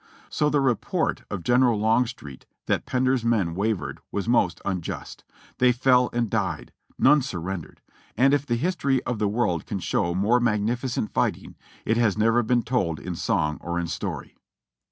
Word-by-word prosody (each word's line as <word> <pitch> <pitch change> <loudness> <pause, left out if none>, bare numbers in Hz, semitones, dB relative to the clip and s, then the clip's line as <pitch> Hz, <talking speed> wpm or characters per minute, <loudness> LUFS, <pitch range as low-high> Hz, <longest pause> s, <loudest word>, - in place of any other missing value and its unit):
So 150 - +1
the 145 -1 +2
report 125 -5 0
of 95 -4 -5
General 120 0 +3
Long 115 +3 +3
street 75 - -10 0.2
that - - -1
Pender's 130 -1 +1
men 105 -8 +1
wavered 100 +2 -2
was 100 +1 -3
most 90 -8 +2
unjust; 90 -4 -5 0.4
they 125 0 +5
fell 125 0 +3
and 120 -1 0
died; - - -2 0.2
none 150 +2 +5
surrendered; 95 - -5 0.4
and 135 +4 +4
if 145 -1 +2
the 120 -5 -1
history 140 -2 0
of 120 -3 -3
the 105 - +1
world 100 -7 -1
can 100 - -3
show 85 -1 -1
more 105 +6 +3
magnificent 115 +1 -1
fighting, - - -1 0.3
it 115 - +1
has 110 -4 +2
never 115 +2 +3
been 120 +1 +1
told 95 - -1
in 90 - -5
song 80 -6 -1
or 85 0 -3
in 85 - -2
story. 85 - -5
115 Hz, 170 wpm, -25 LUFS, 95-125 Hz, 0.4 s, they